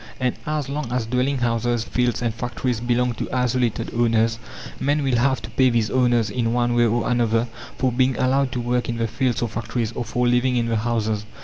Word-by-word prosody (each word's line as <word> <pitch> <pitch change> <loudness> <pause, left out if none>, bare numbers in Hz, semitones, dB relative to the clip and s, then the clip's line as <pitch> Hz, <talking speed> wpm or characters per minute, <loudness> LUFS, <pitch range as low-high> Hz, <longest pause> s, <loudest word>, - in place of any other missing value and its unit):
And 125 -2 +1
as 150 -2 -1
long 140 -3 -4
as 125 -2 0
dwelling 125 +4 0
houses, 120 -1 0
fields, 125 0 -1
and 115 -2 0
factories 120 0 -2
belong 120 +1 +1
to - - -5
isolated 125 -2 0
owners, 115 -1 +2 0.4
men 145 +1 +1
will 130 -3 +1
have 130 +2 +1
to - - -8
pay 130 -1 +4
these 115 -3 0
owners, 120 -4 +2
in 115 -1 0
one 120 0 +1
way 120 0 +4
or 115 +2 0
another, 120 -1 +1 0.3
for 130 -1 +1
being 130 +1 +1
allowed 130 +1 +2
to 125 - -2
work 120 +1 -1
in 115 - -2
the 115 - 0
fields 120 +1 -1
or - - +1
factories, 115 0 -3
or 120 - -4
for 125 +2 0
living 125 +1 +2
in 120 -1 +1
the 115 -1 0
houses. 110 -2 -1
120 Hz, 215 wpm, -22 LUFS, 115-125 Hz, 0.4 s, pay